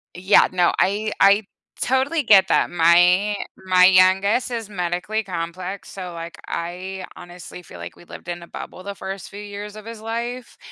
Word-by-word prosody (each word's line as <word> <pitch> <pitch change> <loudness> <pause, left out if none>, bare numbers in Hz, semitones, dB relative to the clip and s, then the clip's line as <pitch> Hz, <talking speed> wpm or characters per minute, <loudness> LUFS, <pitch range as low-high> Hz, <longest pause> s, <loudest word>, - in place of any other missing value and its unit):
Yeah, 190 +3 +4
no, 180 -2 +2
I 210 +3 +1
I 200 +2 +5 0.4
totally 265 +5 +1
get 200 -5 +6
that. - - +2
My 175 +4 +4 0.2
my 185 -1 +4
youngest 190 +6 +4
is 230 -3 -4
medically 180 +3 -2
complex, 180 +1 -6
so, 180 -3 -7
like, 165 0 -8
I 185 +3 -5
honestly 175 0 -11
feel 120 - -13
like 85 0 -9
we - - -17
lived 175 - -12
in 175 0 -5
a 170 - -11
bubble - - -9
the 200 0 -6
first 195 0 -7
few 200 - -10
years 205 0 -8
of 215 0 -11
his 230 -1 -9
life, 235 +2 -5
190 Hz, 175 wpm, -22 LUFS, 175-210 Hz, 0.4 s, get